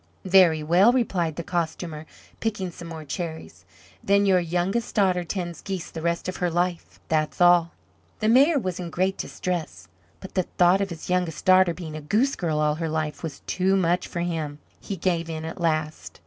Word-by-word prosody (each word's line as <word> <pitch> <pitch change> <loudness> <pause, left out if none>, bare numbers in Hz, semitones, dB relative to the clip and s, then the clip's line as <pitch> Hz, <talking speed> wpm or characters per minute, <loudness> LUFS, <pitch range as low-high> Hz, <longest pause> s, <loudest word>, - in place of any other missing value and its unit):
"Very 180 -5 +5
well," 180 +9 +5
replied 185 -10 0
the 170 - -4
Costumer, 165 -2 -3 0.3
picking 205 -5 -2
some 170 0 -10
more 160 -2 -8
cherries, 145 - -6 0.4
"then 200 +1 +3
your 190 -2 +4
youngest 180 +6 -1
daughter 185 -3 +2
tends 175 -1 -5
geese 190 -3 -5
the 160 - -6
rest 170 +1 -1
of 185 - -4
her 180 - 0
life, 175 0 -2
that's 155 -1 0
all." 175 -1 +5 0.5
The 215 - 0
Mayor 275 +7 +5
was 185 -9 -2
in 175 -2 -5
great 185 +3 0
distress; 155 - -4 0.3
but 190 - -10
the 185 -2 0
thought 180 +2 +5
of 195 - -1
his 170 +1 -7
youngest 180 -4 -1
daughter 185 -2 +5
being 160 -2 -7
a 155 - -6
goose 225 - +1
girl 160 -4 -1
all 150 0 +2
her 165 - -1
life 155 -1 -3
was 160 -4 -6
too 190 +1 +1
much 180 -1 +1
for 170 - -4
him. 160 -4 -3 0.2
He 200 - -6
gave 170 -1 -1
in 160 -1 -5
at 165 +2 -7
last. 155 -2 -2
175 Hz, 190 wpm, -25 LUFS, 160-185 Hz, 0.5 s, Very